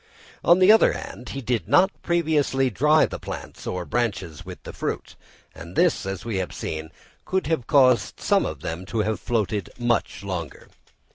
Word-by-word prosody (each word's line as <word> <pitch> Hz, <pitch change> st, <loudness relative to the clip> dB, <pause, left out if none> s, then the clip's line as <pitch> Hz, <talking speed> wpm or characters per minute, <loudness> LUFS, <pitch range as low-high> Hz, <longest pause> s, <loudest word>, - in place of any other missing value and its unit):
On 175 Hz, -, +6 dB
the 185 Hz, +2 st, +7 dB
other 220 Hz, -, +6 dB
hand, 125 Hz, -, -8 dB
he 135 Hz, -, -5 dB
did 120 Hz, -2 st, -1 dB
not 185 Hz, -, +5 dB
previously 150 Hz, -6 st, +1 dB
dry 150 Hz, +7 st, +4 dB
the -, -, -6 dB
plants -, -, -8 dB
or 90 Hz, -1 st, -3 dB
branches 100 Hz, -10 st, -2 dB
with -, -, -10 dB
the -, -, -8 dB
fruit; -, -, -4 dB, 0.4 s
and 85 Hz, +3 st, -11 dB
this, 175 Hz, -, +2 dB
as 95 Hz, +1 st, -5 dB
we 115 Hz, -4 st, -2 dB
have 95 Hz, -1 st, -3 dB
seen, 80 Hz, 0 st, -5 dB, 0.4 s
would 190 Hz, 0 st, +1 dB
have 155 Hz, -6 st, -1 dB
caused 130 Hz, -6 st, +4 dB
some -, -, +2 dB
of 75 Hz, -3 st, -5 dB
them 80 Hz, +2 st, -4 dB
to 110 Hz, -, -1 dB
have 105 Hz, -2 st, -1 dB
floated 105 Hz, -3 st, -1 dB
much 120 Hz, -3 st, -1 dB
longer. 90 Hz, -6 st, -6 dB
120 Hz, 180 wpm, -24 LUFS, 95-150 Hz, 0.4 s, the